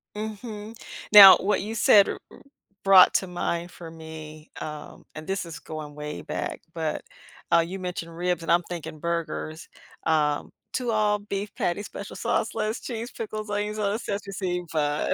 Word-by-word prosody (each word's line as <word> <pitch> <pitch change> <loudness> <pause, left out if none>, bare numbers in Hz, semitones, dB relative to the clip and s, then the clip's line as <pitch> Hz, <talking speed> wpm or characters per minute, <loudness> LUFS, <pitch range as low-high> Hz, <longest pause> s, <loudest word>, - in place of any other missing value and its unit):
Mhm, 215 0 -6 0.4
now, 200 -3 +12
what 200 +1 0
you 215 +3 -5
said, 210 -2 +6
r - - -4
r - - -15 0.4
brought 195 -2 +8
to 190 - +2
mind 175 -1 -3
for 170 -2 -10
me, 160 -1 -10
um, 150 -1 -8
and 155 0 -8
this 190 0 -2
is 165 -3 -8
going 155 -1 -8
way 150 0 -6
back, - - -4
but, 160 -2 -3 0.5
uh, 170 - +6
you 190 +3 -6
mentioned 175 -2 -5
ribs, 175 -1 -1
and 165 - -1
I'm 170 +1 +5
thinking 160 -3 -7
burgers. 170 0 -3 0.4
Um, 150 -2 +1 0.2
two 245 -2 -1
all-beef 210 -1 -1
patties, 180 +4 -1
special 200 - -8
sauce, 230 -1 -1
lettuce, 215 +1 -2
cheese, 235 0 -5
pickles, 215 -1 -6
onions, 210 +1 -2
on 200 -1 0
a 220 - -2
sesame 200 -3 -5
seed 180 -2 -2
bun. 150 -2 0
180 Hz, 170 wpm, -26 LUFS, 160-210 Hz, 0.5 s, now